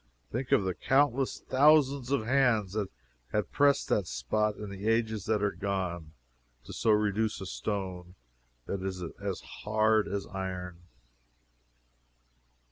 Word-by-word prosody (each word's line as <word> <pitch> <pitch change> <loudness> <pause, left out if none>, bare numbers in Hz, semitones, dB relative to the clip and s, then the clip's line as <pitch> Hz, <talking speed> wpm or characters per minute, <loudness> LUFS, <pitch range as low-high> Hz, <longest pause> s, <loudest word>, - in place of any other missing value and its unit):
Think 125 +1 -3
of - - +5
the 95 -1 -1
countless 135 +3 +1
thousands 140 -2 +4
of 140 -5 +1
hands 120 -6 +2
that 105 -3 -2 0.4
had 105 -4 -1
pressed 140 -1 +3
that 100 -4 +1
spot 105 - 0
in 105 -1 -7
the 100 +2 -5
ages 110 -2 +1
that 105 -1 +1
are 100 - +2
gone, 90 -6 -3 0.5
to - - -10
so - - 0
reduce 105 +1 +2
a 95 - -6
stone 95 -3 -4 0.5
that 100 - -3
is 95 -1 -4 0.2
as - - -3
hard 110 0 +1
as 100 -1 -3
iron! 90 -2 -5
105 Hz, 135 wpm, -30 LUFS, 95-115 Hz, 0.5 s, of